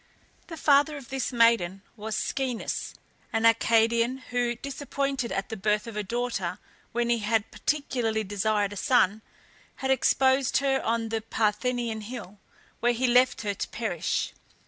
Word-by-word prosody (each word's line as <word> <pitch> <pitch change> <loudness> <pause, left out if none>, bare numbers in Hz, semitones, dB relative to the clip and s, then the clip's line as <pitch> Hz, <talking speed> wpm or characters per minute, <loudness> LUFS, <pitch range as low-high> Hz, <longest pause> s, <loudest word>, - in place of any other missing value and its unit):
The 330 - -8
father 290 0 +4
of 275 -3 -11
this 270 -2 -2
maiden 230 -6 +3
was 215 -1 -4
Schoeneus, 260 -4 -2 0.4
an 225 0 +1
Arcadian, 230 +2 +3
who, 245 -1 0
disappointed 275 -1 -3
at 195 - -2
the 220 - -4
birth 210 +1 0
of 230 -2 -8
a 210 - -1
daughter 205 -4 -2 0.3
when 235 0 0
he 235 - +2
had 215 0 0
particularly 245 -7 -1
desired 205 0 0
a - - -8
son, 220 -6 +3 0.5
had 265 0 -1
exposed 265 0 +3
her 270 -1 +1
on 230 0 -1
the 225 0 -1
Parthenian 225 +1 -1
Hill, 210 -3 -8 0.4
where 240 +1 +2
he 245 +2 0
left 250 +1 +4
her 205 -1 -1
to - - -4
perish. 210 -8 -2
230 Hz, 150 wpm, -27 LUFS, 215-255 Hz, 0.5 s, father